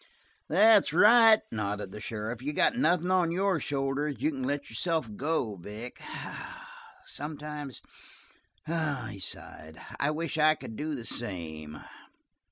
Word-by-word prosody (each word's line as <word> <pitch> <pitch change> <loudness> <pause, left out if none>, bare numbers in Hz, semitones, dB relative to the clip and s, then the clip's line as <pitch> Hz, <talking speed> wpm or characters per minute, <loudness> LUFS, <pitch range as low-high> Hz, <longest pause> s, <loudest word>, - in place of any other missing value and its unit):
"That's 210 +4 +6
right," 225 0 +7
nodded 105 -2 -3
the 105 - -8
sheriff. 110 +2 -4
"You 145 +3 -3
got - - +3
nothing 175 +2 +2
on 180 -3 +3
your 190 0 +1
shoulders. 140 +1 -1
You 145 +8 +1
can 135 -3 -5
let 140 +2 -2
yourself 160 +4 -1
go, 130 -7 -1
Vic. 105 +7 -8 1.0
Sometimes 150 - -5 0.8
I 155 -5 -1
wish" - - -8
he 100 - -9
sighed 80 -3 -5 0.2
"I 140 - +2
wish 160 +1 -2
I 155 +1 +6
could 110 - -9
do 150 +5 -3
the 120 -4 -7
same!" 80 -10 -5
145 Hz, 140 wpm, -29 LUFS, 110-160 Hz, 1.0 s, right